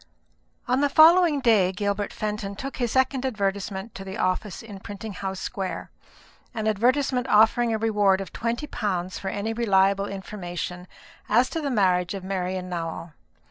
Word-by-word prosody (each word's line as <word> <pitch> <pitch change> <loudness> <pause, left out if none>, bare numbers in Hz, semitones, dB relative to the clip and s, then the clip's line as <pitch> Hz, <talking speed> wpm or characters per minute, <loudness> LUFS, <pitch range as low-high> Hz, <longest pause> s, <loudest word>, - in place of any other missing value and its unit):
On 255 +2 +2
the 285 - +3
following 320 0 +6
day 210 -7 +4
Gilbert 200 +1 -2
Fenton 210 -1 -4
took 270 +6 -6
his 240 -3 -1
second 260 0 +2
advertisement 200 -3 -2
to 195 - -8
the 190 +2 -7
office 185 0 -1
in 205 -3 -9
Printing 205 +2 -7
House 190 0 -4
Square; 195 -5 -4 0.6
an 220 -1 -2
advertisement 250 +4 +1
offering 225 +3 +4
a 220 - +1
reward 210 -3 +2
of 195 - -7
twenty 235 +5 -2
pounds 185 -9 -3
for 195 - -6
any 205 +3 -2
reliable 200 -3 +2
information 180 -3 -6 0.4
as 240 +4 +3
to 325 - -2
the 285 - -2
marriage 185 -5 +2
of 195 - -6
Marian 185 -1 -3
Nowell. 165 -2 -5
205 Hz, 160 wpm, -25 LUFS, 190-235 Hz, 0.6 s, following